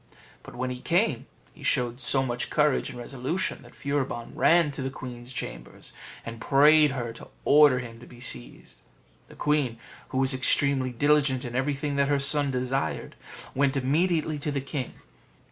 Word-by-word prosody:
But - - -12
when 125 +1 -2
he 125 0 -6
came, 165 - +1 0.3
he - - -17
showed 125 -1 0
so 135 +2 +2
much 120 -2 -3
courage 150 -2 +2
and 125 - -9
resolution 135 +10 -3
that 120 -2 -16
Furibon 135 -4 -3
ran 165 -3 +4
to 135 - -6
the 130 - -2
queen's 125 -2 -9
chamber, - - -7 0.5
and 115 0 -7
prayed 150 +3 +6
her 120 -3 -4
to 115 - -12 0.2
order 145 -3 +6
him 115 -2 -7
to 120 - -13
be 120 - -14
seized. 60 - -6 0.5
The - - -15
queen, 145 -6 0 0.3
who - - -3
was 135 0 +3
extremely 130 0 +2
diligent 140 0 +2
in 120 0 -6
everything 140 +2 -1
that 140 0 +3
her 145 0 +2
son 140 +1 +2
desired, 130 +1 -2 0.4
went 140 +1 +1
immediately 155 +3 +1
to 150 +1 -2
the 140 - -1
king. 135 -1 -5
135 Hz, 170 wpm, -27 LUFS, 125-145 Hz, 0.5 s, prayed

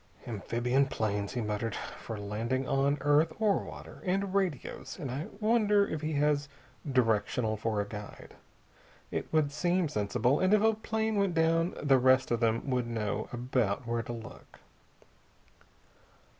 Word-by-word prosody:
"Amphibian 120 +5 0
planes," 105 -4 -2
he 125 - -1
muttered, 105 +1 -2
"for 110 - -6
landing 115 +6 -2
on 140 +1 +2
earth 145 +3 +3
or 215 -3 +3
water. - - -10
And 190 +1 0
radios. 185 -3 -2
I 140 0 -4
wonder 210 -2 +3
if 155 - -4
he 155 0 -2
has 145 -1 +1 0.4
directional 115 -2 +1
for 110 0 -1
a - - -3
guide? 105 -1 -9 0.8
It - - -3
would 155 -3 +2
seem 175 +2 +1
sensible, 120 +4 +1
and 185 +3 +4
if 210 - +2
a 220 0 +5
plane 220 0 -1
went 200 -4 +1
down 165 +2 +2
the 135 -3 +5
rest 130 0 +4
of 120 - +2
them 115 +2 +1
would 125 -2 0
know 110 -2 -2
about 120 -3 -1
where 115 0 -1
to 115 - -7
look." 115 -1 -11
130 Hz, 150 wpm, -30 LUFS, 115-165 Hz, 0.8 s, a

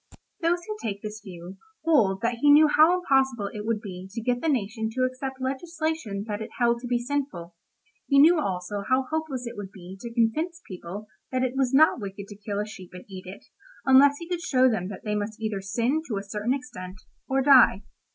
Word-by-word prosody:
Those 345 +1 +1
who 430 - -4
take 200 -2 -4
this 215 0 -6
view 180 -1 -10 0.3
hold 220 -12 +3
that 235 0 -1
he 290 - +5
knew 300 +2 +8
how 315 +4 +5
impossible 265 - +1
it 210 0 -6
would 225 -2 0
be 185 -2 -8
to 230 - -4
get 245 0 0
the 325 - 0
nation 220 -4 -1
to 255 - +1
accept 260 +1 -3
legislation 275 -5 -3
that 210 0 -3
it 220 - -5
held 235 -1 +2
to 245 - -5
be 245 0 +1
sinful; 240 -9 -3 0.5
he 280 - +3
knew 320 +4 +7
also 195 -4 -3
how 260 +1 +3
hopeless 315 -6 -2
it 235 0 -6
would 200 -2 -7
be 185 -1 -11
to 235 - -6
convince 280 +9 0
people 185 +2 -7 0.3
that 255 0 0
it 255 -1 0
was 265 -2 +1
not 290 -1 +5
wicked 200 0 -6
to 205 - -9
kill 205 0 -4
a 210 - -1
sheep 190 -4 -11
and 180 - -10
eat 190 -2 -9
it, 190 - -10 0.4
unless 275 +2 +6
he 335 - -8
could 350 -1 -3
show 260 -7 +3
them 205 -7 0
that 195 -2 -8
they 210 - -2
must 210 +1 -3
either 215 -3 -2
sin 235 +10 0
to 215 - -2
a 195 - -4
certain 210 +5 -1
extent, 185 -8 -8 0.3
or 270 0 +1
die. 255 -8 +6
235 Hz, 220 wpm, -26 LUFS, 200-275 Hz, 0.5 s, knew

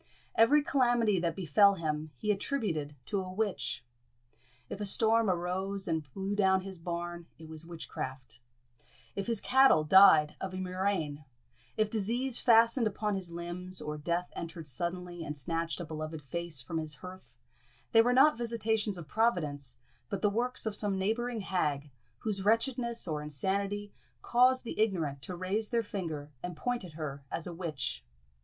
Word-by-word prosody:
Every 285 +7 +5
calamity 240 -8 +3
that 170 -1 -1
befell 195 +3 +4
him 155 -2 -3
he 210 - 0
attributed 195 - -2
to 200 +5 -1
a 185 0 -6
witch. 195 - -2 0.8
If 200 - -6
a - - -1
storm 225 +1 +3
arose 190 +3 -2
and 160 -5 -2
blew 195 +1 -2
down 190 -2 +3
his 190 -2 -8
barn, 170 0 -5
it 160 - -11
was 160 +1 -7
witchcraft; 130 -7 -6 0.8
if 200 +1 -3
his 230 -3 0
cattle 265 -12 +5
died 155 -3 +7
of 190 -1 -4
a - - -4
murrain 185 -5 -2 0.5
if 215 -1 +3
disease 235 +4 0
fastened 230 0 +5
upon 210 0 -1
his 190 -3 -2
limbs, 175 +2 -6
or 150 0 -4
death 170 +3 -1
entered 165 -1 -6
suddenly 175 +5 -3
and 150 -1 -5
snatched 165 +5 -2
a 175 - -4
beloved 155 0 -6
face 170 -2 -2
from 165 +6 -3
his 155 -2 -5
hearth 185 +3 -12 0.5
they 225 - +7
were 245 +2 +3
not 270 +5 +6
visitations 220 -3 0
of 170 -3 -8
Providence, 150 - 0 0.3
but 200 -2 -4
the 205 - +4
works 245 +4 0
of 220 - 0
some 205 -2 +1
neighbouring 225 +4 -1
hag, 150 -7 -1 0.3
whose 195 - -1
wretchedness 235 +1 +1
or 150 -2 -2
insanity 200 +7 -2 0.3
caused 255 +2 +4
the 235 - -6
ignorant 165 -10 0
to 180 - -5
raise 195 +5 -1
their 235 -1 +1
finger 160 -8 -5
and 180 -2 -6
point 245 +4 -2
at 175 -4 -10
her 145 -3 -5
as 165 - -3
a 175 - -5
witch. 135 - -4
185 Hz, 165 wpm, -31 LUFS, 160-215 Hz, 0.8 s, died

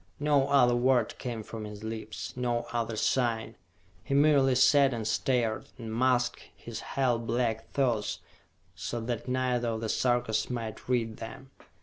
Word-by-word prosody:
No 145 -2 +3
other 125 -4 +5
word 125 -1 +2
came 115 -3 -4
from 110 0 -7
his 105 0 -8
lips, 110 -1 -6
no 120 -1 -1
other 115 -1 -1
sign. 115 0 0 0.5
He 140 - -1
merely 140 -3 +5
sat 135 0 +5
and 110 -2 -3
stared, 115 -1 0
and 115 -2 -6
masked 120 -1 +2
his 115 -1 -7
hell 125 -4 0
black 115 -1 -1
thoughts 120 -6 0 0.6
so 120 - -4
that 120 +1 -4
neither 125 -1 0
of 115 -1 -2
the 110 - -2
Sarkas 120 -3 +1
might 115 -2 -5
read 115 -3 0
them. 130 +4 -9
120 Hz, 150 wpm, -29 LUFS, 115-130 Hz, 0.6 s, other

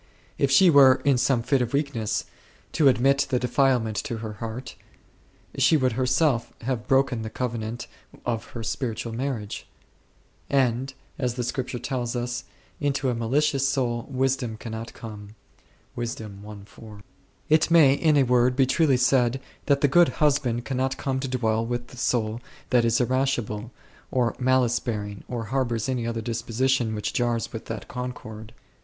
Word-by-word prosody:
If 140 - +3
she 170 +6 +6
were, 135 -3 +8
in 140 -3 +4
some 130 -2 +2
fit 130 +2 +2
of 120 +1 -2
weakness, 120 -7 -1 0.5
to 155 -3 +3
admit 135 +2 +3
the 130 - +2
defilement 125 -3 +1
to 125 -6 -3
her 110 -1 -6
heart, 115 +3 -6 0.9
she 135 +4 +5
would 130 -3 +1
herself 130 0 +1
have 120 -1 -3
broken 135 -3 +2
the 110 - -5
covenant 115 -1 -4 0.4
of 115 -2 -2
her 115 - -5
spiritual 115 -1 -3
marriage; 120 -4 -4 0.8
and, 130 -1 +1 0.3
as 125 -3 -1
the 125 - -2
Scripture 125 +1 -3
tells 125 -1 -3
us, 120 0 -3 0.2
" - - -33
into 140 -1 -1
the 125 - +2
malicious 135 +4 +1
soul 120 -4 -1
Wisdom 130 -3 -1
cannot 110 0 -6
come5." 105 -2 -9 2.1
It 155 +1 +3
may, 160 -5 +6
in 150 +1 +3
a 140 - +5
word, 125 0 +3
be 135 0 +4
truly 140 0 +3
said 125 0 +2 0.3
that 140 -1 +3
the 145 - +5
Good 175 +5 +5
Husband 135 -6 +1
cannot 130 +2 -1
come 135 -1 -2
to 135 - -3
dwell 115 -3 0
with 120 +1 -4
the 125 - -13
soul 115 -2 0 0.3
that 120 -2 +4
is 115 0 +2
irascible, 125 -4 0 0.4
or 125 -2 0
malice 125 -2 +2
bearing, 105 -3 -5
or 120 -2 -4
harbours 120 -4 0
any 125 -3 -1
other 115 -1 -2
disposition 115 +1 0
which 105 - -3
jars 120 -2 -1
with 110 - -6
that 110 -2 -6
concord. 110 -3 -7
125 Hz, 155 wpm, -25 LUFS, 115-135 Hz, 2.1 s, were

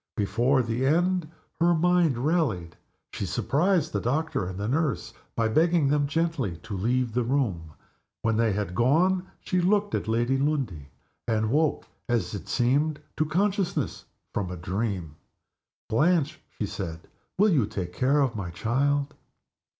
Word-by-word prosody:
Before 120 +7 +2
the 115 +2 -2
end 175 +3 +2 0.3
her 170 +1 +4
mind 170 -4 +3
rallied. 120 - 0 0.4
She 100 - -3
surprised 155 - +1
the - - 0
doctor 140 - -1
and 95 0 -6
the 100 +1 -2
nurse 140 0 -1 0.2
by 115 -1 +2
begging 160 +4 +3
them 145 0 +2
gently 150 - -1
to 105 - -5
leave 120 +4 0
the 125 - +1
room. 110 - -1 0.5
When 115 -1 +2
they 115 0 +2
had 100 -2 -2
gone 175 - +2
she 185 -1 0
looked 205 +3 +2
at - - -1
Lady 120 +4 +1
Lundie, 130 - -1 0.4
and 110 -1 +1
woke, 155 +2 +1 0.2
as 120 -2 0
it 100 - -6
seemed, 140 +5 +1 0.2
to 155 - +1
consciousness 190 +3 0 0.3
from 100 -3 -2
a 90 - -5
dream. 90 -3 -3 0.7
"Blanche," 155 +5 +2 0.2
she 105 - -1
said, 85 -5 -5 0.4
"you 195 -6 +4
will 105 - +1
take 90 -4 -5
care 140 +3 +2
of 130 -5 +1
my 95 -4 -4
child?" 140 - 0
130 Hz, 150 wpm, -26 LUFS, 105-160 Hz, 0.7 s, her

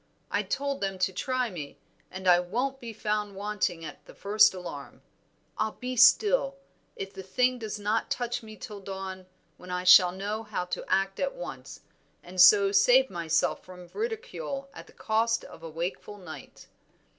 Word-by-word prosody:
I - - +1
told 280 0 -3
them 195 -1 -2
to 185 +1 0
try 255 +3 -1
me, 150 -6 -8 0.3
and 190 0 -6
I 175 -1 +7
won't 245 +10 -2
be 235 -3 -7
found 210 -2 -2
wanting 200 -4 -2
at - - -10
the - - -15
first 210 +1 +4
alarm. 170 -6 -9 0.6
I'll 215 0 0
be 255 0 -5
still, 275 - +5 0.4
if 195 0 -7
the 190 - -7
thing 250 +7 +1
does 220 -2 -5
not 210 +2 -1
touch 245 -1 -2
me 215 -1 -12
till 210 0 -8
dawn, 190 -1 -7 0.3
when 180 - -13
I 180 0 -2
shall 185 -1 +8
know 205 +4 -4
how 210 -5 -4
to 180 - -4
act 195 +1 0
at - - -1
once, - - -8 0.4
and 180 +1 0
so 195 +1 +7
save 250 +5 +5
myself 165 -2 0
from 180 -1 -13
ridicule 445 - -5
at - - -11
the - - -18
cost 230 +1 0
of - - -12
a 165 - -7
wakeful 175 +5 -5
night." 160 -7 -11
205 Hz, 175 wpm, -28 LUFS, 185-245 Hz, 0.6 s, shall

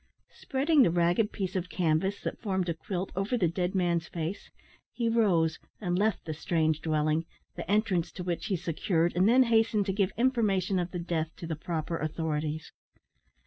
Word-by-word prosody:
Spreading 285 +3 +2
the 235 - +6
ragged 175 +5 +2
piece 190 -3 -4
of 180 -1 -2
canvas 180 +4 0
that - - -4
formed 190 -4 -1
a - - +1
quilt 180 +3 -4
over 195 +6 0
the 185 -7 +2
dead 180 +3 -2
man's 170 -3 +1
face, 170 +3 -5 0.4
he 235 -2 -1
rose, 185 -9 +2 0.2
and 175 -4 -1
left 205 +1 +1
the 160 - -3
strange 160 -1 0
dwelling, 155 +1 +1 0.3
the - - -7
entrance 200 -5 +1
to 180 - -6
which 175 -1 -2
he 195 - +1
secured, 170 0 0
and 185 +4 +4
then 255 +2 +6
hastened 225 -3 +2
to 195 - -1
give 195 -1 +1
information 210 -7 +2
of 175 0 -2
the 180 - -5
death 170 -2 -2
to - - -8
the 165 -1 -3
proper 165 +1 -3
authorities. 155 -1 -2
180 Hz, 185 wpm, -29 LUFS, 165-205 Hz, 0.4 s, the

